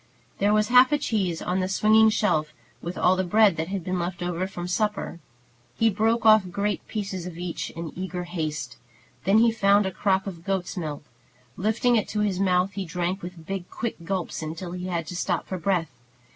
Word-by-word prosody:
There 205 +1 +3
was 215 +1 +2
half 255 +2 +7
a 295 - +4
cheese 195 - -1
on 180 +1 0
the 185 - 0
swinging 220 +3 +5
shelf, 155 -9 0 0.3
with 175 +2 -5
all 185 - +4
the 185 - 0
bread 205 +1 +4
that 160 0 -2
had 190 -1 -3
been 185 +1 -2
left 175 0 -3 0.3
from 175 -1 -5
supper. 210 -2 -1 0.6
He 225 0 +3
broke 225 +3 +1
off 215 -4 +6
great 200 +3 -2
pieces 195 -4 -4
of 170 -2 -8
each 175 -1 -4
in 165 -1 -7
eager 180 -1 -4
haste. 155 -8 -4 0.5
Then 195 +3 +5
he 230 +1 +5
found 200 -2 +3
a 190 - -1
crock 190 0 +1
of 175 -4 -7
goat's 190 -1 -2
milk. 155 -5 -4 0.5
Lifting 220 +4 +2
it 215 - 0
to 210 - -2
his 200 -3 0
mouth, 185 0 +2
he 195 0 -4
drank 180 +2 -2
with 175 -2 -9
big, 190 -1 -5
quick 235 0 -4
gulps 185 -1 -3
until 160 +3 -5
he 180 +1 -5
had 170 -3 -2
to 175 - -7
stop 175 -1 -1
for 185 - -4
breath. 170 -3 0
185 Hz, 200 wpm, -25 LUFS, 175-210 Hz, 0.6 s, half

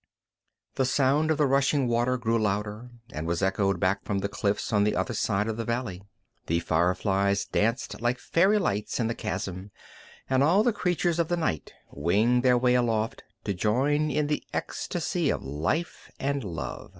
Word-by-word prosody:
The 130 - +2
sound 140 +4 +2
of 155 - +2
the 150 - +3
rushing 135 0 +2
water 120 +2 +1
grew 115 -1 0
louder, 105 +3 -2 0.2
and 75 +2 -4
was 85 +2 -1
echoed 95 0 +1
back 95 +2 +1
from 100 - -2
the 100 +1 -1
cliffs 100 +2 -2
on 105 -1 +4
the 105 - +1
other 120 - -1
side 105 -1 0
of 110 -1 -3
the 115 - -2
valley. 115 -5 -3 0.5
The 85 +1 +1
fireflies 95 +4 +1
danced 115 +4 -1
like 120 +1 +1
fairy 190 +10 +3
lights 105 - -1
in 115 - +1
the 115 - 0
chasm, 95 -3 -4 0.6
and 130 0 +2
all 175 +9 +4
the 240 -1 +2
creatures 175 -3 0
of 170 - +2
the 175 - 0
night 120 - -2 0.2
winged 105 +11 +2
their 125 -1 +4
way 125 0 +3
aloft 115 0 0 0.2
to 100 - -1
join 135 +11 +1
in 150 +1 0
the 150 0 -1
ecstasy - - -2
of - - -1
life 80 - -3
and 140 0 -1
love. 85 -5 -6
115 Hz, 180 wpm, -27 LUFS, 100-135 Hz, 0.6 s, on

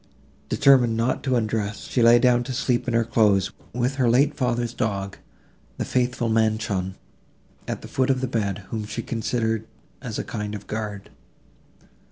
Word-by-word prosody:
Determined 130 -5 +4
not 115 +3 0
to 130 -2 +2
undress, 110 -3 -1
she 125 - -1
lay 115 +1 +7
down 120 0 +3
to 130 - -4
sleep 125 0 0
in 120 - 0
her 115 - +4
clothes, 105 -4 +2 0.2
with 125 +3 -1
her 125 -3 +3
late 140 +5 +4
father's 120 -3 -1
dog, 100 -4 -2 0.6
the - - -2
faithful 125 -1 0
Manchon, 110 -4 0 0.7
at - - -4
the - - -7
foot 130 0 0
of 130 -1 +2
the 130 - -1
bed, 100 -5 -2
whom 110 -2 -2
she 115 +2 -4
considered 110 -1 -1 0.3
as - - -5
a - - -2
kind 105 0 -4
of 105 - -8
guard. 105 -2 -5
115 Hz, 170 wpm, -24 LUFS, 105-125 Hz, 0.7 s, lay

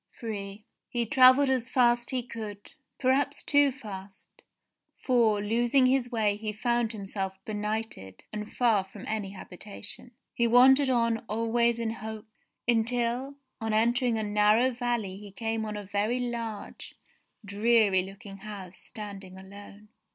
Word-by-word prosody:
Ill 200 -3 -5 0.3
He 240 -1 -1
travelled 260 +3 +6
as 255 -1 0
fast 240 -1 +3
as 260 - -1
he 250 - -2
could; 210 -4 -8 0.2
perhaps 275 +2 +1
too 285 -1 +4
fast, 200 -6 -11 0.6
for, 230 -5 +2
losing 240 +5 +3
his 255 -1 +2
way 215 -3 +1
he 215 0 -4
found 235 +1 0
himself 195 -2 -4
benighted 210 - -4
and 210 0 -5
far 225 -6 +2
from 195 +1 -12
any 215 -3 -2
habitation. 200 +4 -7 0.2
He 235 - +2
wandered 260 +3 +6
on 230 -2 +2
always 230 +2 +1
in 230 -1 -2
hopes, 220 -1 -8 0.4
until 240 +3 0 0.3
on 225 -1 -1
entering 235 +2 +2
a 220 - -1
narrow 210 +4 +3
valley 240 -6 -2
he 205 0 -10
came 225 +2 -3
on 210 0 -4
a 205 - -6
very 205 +5 -1
large, 230 -4 -5 0.5
dreary 205 -1 +3
looking 195 +1 -10
house 195 -3 -9
standing 200 -4 -9
alone. 200 +2 -13
220 Hz, 140 wpm, -28 LUFS, 205-240 Hz, 0.6 s, travelled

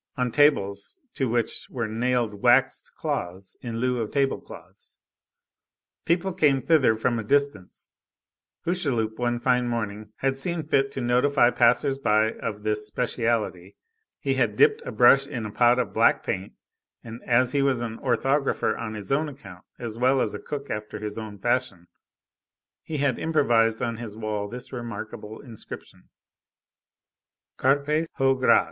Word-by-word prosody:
on 125 -1 0
tables 100 -10 +2
to 135 -3 -1
which 120 0 -1
were 115 -3 -3
nailed 120 0 0
waxed 125 +2 +3
cloths 95 +2 -4
in 115 -2 -5
lieu 125 +1 0
of 110 -2 -2
table 140 -1 0
cloths. - - -14 1.1
People 175 +3 +1
came 145 -5 +3
thither 135 -4 +3
from 115 +1 0
a - - -3
distance. 140 -6 -1 0.7
Hucheloup, 130 -11 -1
one 120 -1 0
fine 125 0 +2
morning, 110 -3 -3
had 135 0 -1
seen 170 +2 -1
fit 135 -2 +1
to 130 - -4
notify 125 +1 +3
passers 125 +3 +2
by 110 -3 +2
of 105 -3 -6
this 105 0 -1
"specialty"; 115 -5 -2 0.4
he - - 0
had - - +1
dipped 445 +1 +4
a - - -3
brush 135 0 +5
in 120 -6 -5
a 105 - -5
pot 120 +3 +4
of 125 - -1
black - - +3
paint, 95 +1 -3 0.5
and 115 0 -9
as 125 +1 +3
he 140 - +1
was 135 -3 +2
an 115 -1 -5
orthographer 135 +3 +1
on 110 -2 -5
his 105 +1 -6
own 150 +3 +1
account, 100 -10 -12
as 115 -2 -6
well 130 +2 +3
as - - 0
a - - -5
cook 140 -1 -6
after 105 0 -5
his 105 0 -5
own 110 -2 -8
fashion, 120 -5 -1 1.0
he 155 - -5
had 140 -4 0
improvised 120 -8 +2
on 115 -1 -2
his 110 -3 -7
wall 105 -2 -3
this 125 +5 -8
remarkable 110 -2 -7
inscription:— 115 -5 -11 1.5
CARPES 145 +4 +1
HO 135 0 +3
GRAS. 130 -1 +4
120 Hz, 155 wpm, -25 LUFS, 110-135 Hz, 1.5 s, brush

